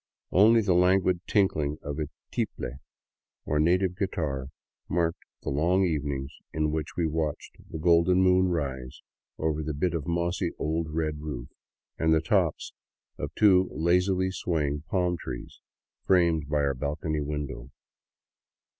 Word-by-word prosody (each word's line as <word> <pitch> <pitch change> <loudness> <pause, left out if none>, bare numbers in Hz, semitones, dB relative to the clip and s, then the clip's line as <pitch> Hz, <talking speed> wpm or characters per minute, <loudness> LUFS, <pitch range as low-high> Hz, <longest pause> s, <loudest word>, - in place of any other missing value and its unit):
Only 110 +5 +6
the 100 -4 +2
languid 90 0 +3
tinkhng 75 -8 +1
of 75 +1 -4
a 75 - -1 0.2
tiple, 65 +2 -3 0.7
or 75 - 0
native 90 +3 +2
guitar, 75 -9 -2 0.4
marked 85 -1 0 0.2
the - - -2
long 85 +7 +2
evenings 70 -4 -2 0.2
in 75 -1 0
which 80 0 -3
we 85 - +1
watched 80 -2 -3
the - - -5
golden 85 +2 +4
moon 95 0 +4
rise 65 -7 -3 0.3
over 80 -1 -1
the 75 -1 -3
bit 85 +4 0
of 80 -4 -3
mossy, 85 +1 0
old 80 +1 -1
red 75 -1 -2
roof 70 -6 -6 0.5
and 80 0 +4
the - - +4
tops 80 - 0 0.5
of - - -3
two 95 -3 +5
lazily 90 +3 +2
swaying 75 -5 -2
palm 90 -2 +1
trees 60 - -7 0.5
framed 85 -5 +3
by 75 -1 +1
our 70 -1 +1
balcony 75 +3 -2
window. 70 -4 -4
80 Hz, 140 wpm, -27 LUFS, 75-90 Hz, 0.7 s, Only